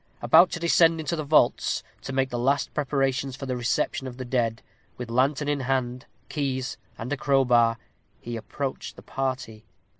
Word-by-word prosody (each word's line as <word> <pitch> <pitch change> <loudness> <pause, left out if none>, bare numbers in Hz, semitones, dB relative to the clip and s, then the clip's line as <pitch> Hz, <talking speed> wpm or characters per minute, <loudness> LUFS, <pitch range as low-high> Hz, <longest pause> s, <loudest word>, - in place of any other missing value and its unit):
About 160 +10 +6
to 175 - -3
descend 165 -1 +4
into 160 +2 -2
the 155 - -3
vaults, 145 -4 +2 0.2
to - - -6
make 135 0 0
the 120 - -2
last 135 +4 +1
preparations 135 -2 0
for 135 - -7
the 130 -1 -2
reception 125 +2 -1
of 125 -1 -8
the 130 - -5
dead, 120 -2 -1 0.3
with 125 -2 -6
lantern 135 +4 +1
in 145 -1 0
hand, 130 0 -2 0.2
keys, 130 -4 -2 0.2
and 125 +5 -4
a - - -2
crowbar, 125 -5 +3 0.4
he 120 0 -6
approached 135 +4 -5
the - - -13
party. 130 -5 -4
130 Hz, 175 wpm, -26 LUFS, 125-145 Hz, 0.4 s, About